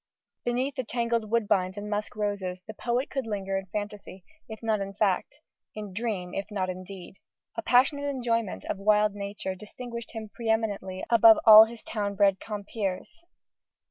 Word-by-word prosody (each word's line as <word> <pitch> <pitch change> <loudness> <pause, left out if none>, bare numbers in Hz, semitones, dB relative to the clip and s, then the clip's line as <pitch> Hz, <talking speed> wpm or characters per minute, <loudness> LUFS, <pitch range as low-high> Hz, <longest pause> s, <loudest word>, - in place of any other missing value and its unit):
Beneath 250 +3 -1
the 260 - -3
tangled 235 -2 -1
woodbines 200 -4 +1
and 205 +1 -5
musk 210 0 -3
roses, 200 -3 -2
the 220 - -8
poet 245 +5 -1
could 270 -4 -3
linger 195 -2 -3
in 195 0 -3
fantasy, 205 -1 -6 0.3
if 220 +1 -9
not 220 -2 +1
in 195 0 -5
fact, 205 +8 0 0.3
in 210 -3 -7
dream, 195 -4 -3
if 200 +2 -4
not 190 -3 -2
in 185 0 -8
deed. 190 0 -11 0.4
A 225 - -2
passionate 275 +5 +3
enjoyment 230 -6 -2
of 195 - -3
wild 210 0 +3
nature 200 -1 -5
distinguished 235 +4 -8
him 220 -1 -6
pre 230 -2 -4
eminently 200 -4 -1
above 225 -1 +8
all 220 0 +11
his 230 0 -11
town 205 -2 -3
bred 195 -1 +3
compeers. 205 - -5
210 Hz, 170 wpm, -27 LUFS, 195-230 Hz, 0.4 s, all